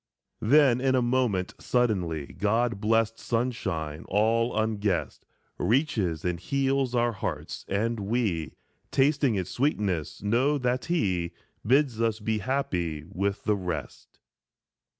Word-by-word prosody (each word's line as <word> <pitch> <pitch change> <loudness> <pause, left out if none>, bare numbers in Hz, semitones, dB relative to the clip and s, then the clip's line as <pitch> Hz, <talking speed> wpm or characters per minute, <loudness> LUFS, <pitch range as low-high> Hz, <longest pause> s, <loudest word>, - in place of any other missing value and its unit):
Then 130 0 +5
in 130 0 +2
a 130 - +3
moment 120 -7 +1
suddenly 90 - 0
God's 115 +4 +1
blessed 115 +1 +1
sunshine, 95 -10 -2
all 115 +3 +2
unguessed, 105 -4 -1 0.3
Reaches 105 - +1
and 90 -1 -1
heals 135 +2 0
our 120 0 +2
hearts, 105 - -5
and 115 +3 -1
we, 100 -6 -1 0.4
Tasting 140 -3 +2
its 95 -3 -3
sweetness, 100 - -1
know 125 +8 +2
that 125 -1 -1
he 95 - 0 0.3
Bids 130 -1 +2
us 110 -1 +1
be 110 0 -1
happy 90 - -2
with 100 +1 -2
the 105 - +2
rest. 90 -9 -6
110 Hz, 120 wpm, -27 LUFS, 95-125 Hz, 0.4 s, Then